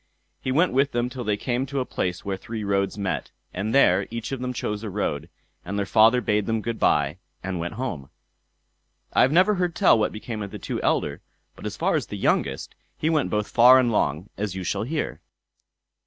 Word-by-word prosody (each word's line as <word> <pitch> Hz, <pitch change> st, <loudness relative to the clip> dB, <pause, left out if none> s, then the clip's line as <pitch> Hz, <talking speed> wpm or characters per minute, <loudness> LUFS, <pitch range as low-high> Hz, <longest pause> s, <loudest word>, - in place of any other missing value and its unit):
He 130 Hz, -, -2 dB
went 165 Hz, +5 st, +3 dB
with 135 Hz, +2 st, +2 dB
them 120 Hz, +1 st, -1 dB
till 125 Hz, -1 st, -5 dB
they 105 Hz, -2 st, 0 dB
came 125 Hz, +4 st, -2 dB
to 140 Hz, +1 st, -2 dB
a 130 Hz, -, -1 dB
place 90 Hz, -6 st, -3 dB
where 100 Hz, -1 st, -1 dB
three 110 Hz, +3 st, -6 dB
roads 100 Hz, 0 st, 0 dB
met, 100 Hz, -2 st, -2 dB, 0.2 s
and 100 Hz, +4 st, -2 dB
there 95 Hz, -8 st, +4 dB
each 115 Hz, +1 st, -5 dB
of 135 Hz, -, -3 dB
them 125 Hz, 0 st, -2 dB
chose 105 Hz, -4 st, -3 dB
a 110 Hz, -, -5 dB
road, 85 Hz, -6 st, -3 dB, 0.3 s
and 100 Hz, +3 st, -4 dB
their 100 Hz, -, 0 dB
father 115 Hz, +4 st, +5 dB
bade 105 Hz, -2 st, 0 dB
them 115 Hz, 0 st, +1 dB
good 115 Hz, -1 st, -3 dB
bye, 75 Hz, +4 st, +2 dB, 0.2 s
and 95 Hz, -1 st, -3 dB
went 85 Hz, +3 st, -3 dB
back -, -, -11 dB
home. 80 Hz, -, -4 dB, 1.0 s
I -, -, +4 dB
have 130 Hz, -, +4 dB
never 185 Hz, +6 st, +5 dB
heard 180 Hz, -3 st, -1 dB
tell 185 Hz, -, +5 dB
what 105 Hz, -, +1 dB
became 110 Hz, 0 st, -6 dB
of 100 Hz, -, -4 dB
the -, -, -7 dB
two -, -, -4 dB
elder; -, -, 0 dB, 0.3 s
but -, -, -7 dB
as -, -, -6 dB
for -, -, +2 dB
the -, -, -7 dB
youngest, -, -, 0 dB, 0.2 s
he 160 Hz, -, 0 dB
went 155 Hz, -3 st, +1 dB
both 105 Hz, 0 st, -1 dB
far 125 Hz, +2 st, +8 dB
and 125 Hz, -2 st, +3 dB
long, 80 Hz, -3 st, 0 dB
as 100 Hz, -3 st, -2 dB
you 95 Hz, -, -4 dB
shall -, -, -1 dB
hear. 150 Hz, +7 st, -3 dB
110 Hz, 220 wpm, -24 LUFS, 100-130 Hz, 1.0 s, far